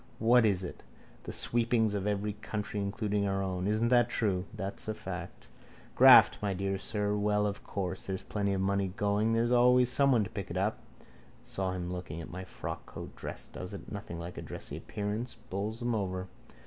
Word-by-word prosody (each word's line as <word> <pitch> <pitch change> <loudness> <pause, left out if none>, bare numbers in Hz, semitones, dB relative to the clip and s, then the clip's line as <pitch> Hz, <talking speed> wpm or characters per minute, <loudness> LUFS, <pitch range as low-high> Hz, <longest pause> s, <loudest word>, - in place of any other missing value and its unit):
What 115 +1 +5
is 95 -3 +1
it? 90 - -7 0.4
The - - -4
sweepings 115 -2 +2
of 100 0 -1
every 105 0 -1
country 105 0 -4
including 100 0 -1
our 95 0 0
own. 95 0 -2
Isn't 110 +3 +2
that 120 -1 +4
true? 95 -6 0
That's 100 -2 -5
a 110 - -2
fact. 90 -5 -7 0.5
Graft, - - +8
my 100 -2 -1
dear 95 +1 -1
sir. 105 0 -1
Well, 105 0 +2
of 100 0 -3
course, 95 -2 -4
where 95 -1 -1
there's 100 -1 -1
money 100 0 +1
going 105 +2 +2
there's 115 +1 +2
always 125 0 +5
someone 135 -4 +4
to - - -6
pick 100 -2 -5
it 85 - -4
up. 100 +3 0 0.6
Saw 95 -1 -2
him 90 -1 -4
looking 90 -3 -6
at 85 - -8
my 90 +1 -6
frockcoat. 95 - -7
Dress - - -5
does - - -7
it. - - -10
Nothing 85 - -6
like 85 +1 -6
a - - -5
dressy - - -7
appearance. 105 +4 -4
Bowls 105 +5 -3
them 120 0 0
over. 95 -3 -2
100 Hz, 185 wpm, -31 LUFS, 95-110 Hz, 0.6 s, Graft